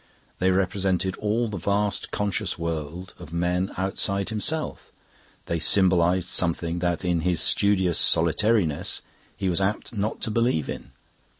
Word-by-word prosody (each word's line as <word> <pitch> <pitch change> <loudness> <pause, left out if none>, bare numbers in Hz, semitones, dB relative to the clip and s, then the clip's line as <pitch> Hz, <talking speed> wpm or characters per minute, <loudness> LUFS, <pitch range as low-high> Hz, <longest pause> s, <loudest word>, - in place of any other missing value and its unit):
They 95 - +3
represented 95 0 0
all 110 +3 0
the 100 -3 -5
vast 100 +2 -1
conscious 105 0 -1
world 85 +2 -5
of 85 -3 -11
men 90 +2 0
outside 100 +1 0
himself; 150 +9 -3 0.5
they 85 - -2
symbolised 90 0 +3
something 85 -1 -1
that 85 0 -1
in 90 -1 +1
his 85 0 +1
studious 95 -4 +3
solitariness 85 0 +2 0.3
he 95 - -2
was 90 +1 0
apt 105 +4 -1
not 105 0 -2
to 110 - -2
believe 115 - +1
in. - - -8
95 Hz, 135 wpm, -25 LUFS, 85-100 Hz, 0.5 s, They